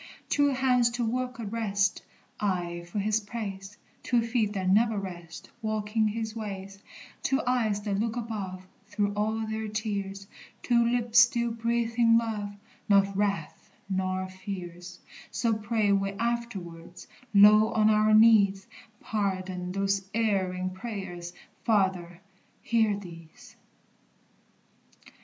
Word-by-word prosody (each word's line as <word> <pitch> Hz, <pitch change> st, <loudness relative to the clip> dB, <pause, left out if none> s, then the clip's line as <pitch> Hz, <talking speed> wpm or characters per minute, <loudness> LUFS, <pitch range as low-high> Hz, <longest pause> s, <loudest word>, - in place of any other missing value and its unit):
"Two 285 Hz, 0 st, +3 dB
hands 255 Hz, -3 st, +3 dB
to 240 Hz, 0 st, -2 dB
work 250 Hz, +1 st, -2 dB
addrest 205 Hz, -3 st, -1 dB, 0.4 s
Aye 175 Hz, -4 st, -2 dB
for -, -, -4 dB
his 210 Hz, +1 st, +1 dB
praise; 205 Hz, -2 st, -7 dB, 0.2 s
Two 240 Hz, -2 st, +1 dB
feet 225 Hz, -3 st, 0 dB
that 190 Hz, -2 st, -2 dB
never 220 Hz, +3 st, +3 dB
rest 175 Hz, -4 st, -8 dB
Walking 215 Hz, 0 st, 0 dB
his 220 Hz, +1 st, -3 dB
ways; 195 Hz, -3 st, -7 dB, 0.4 s
Two 270 Hz, -, +1 dB
eyes 225 Hz, -5 st, +1 dB
that 200 Hz, -1 st, -2 dB
look 225 Hz, +1 st, -1 dB
above 200 Hz, -5 st, -5 dB, 0.2 s
Through 205 Hz, -1 st, -1 dB
all 220 Hz, +2 st, -1 dB
their 220 Hz, 0 st, -3 dB
tears; 200 Hz, -2 st, -4 dB, 0.4 s
Two 235 Hz, -1 st, +3 dB
lips 235 Hz, 0 st, +3 dB
still 235 Hz, 0 st, +4 dB
breathing 230 Hz, 0 st, +2 dB
love, 210 Hz, -3 st, -2 dB, 0.3 s
Not 200 Hz, -1 st, +4 dB
wrath, 200 Hz, -5 st, -2 dB, 0.2 s
nor 185 Hz, -1 st, -1 dB
fears:" 180 Hz, -2 st, -8 dB, 0.3 s
So 230 Hz, -2 st, 0 dB
pray 215 Hz, -1 st, 0 dB
we 195 Hz, 0 st, +1 dB
afterwards, 195 Hz, -7 st, -4 dB, 0.3 s
low 210 Hz, +1 st, +7 dB
on 215 Hz, -1 st, +3 dB
our 215 Hz, 0 st, +3 dB
knees; 205 Hz, -3 st, +5 dB, 0.4 s
Pardon 185 Hz, -3 st, -2 dB
those 195 Hz, 0 st, -1 dB
erring 185 Hz, -5 st, 0 dB
prayers! 185 Hz, -4 st, -6 dB, 0.3 s
Father, 190 Hz, -5 st, 0 dB, 0.4 s
hear 220 Hz, -3 st, +2 dB
these! 165 Hz, -5 st, -12 dB
210 Hz, 120 wpm, -28 LUFS, 190-225 Hz, 0.4 s, low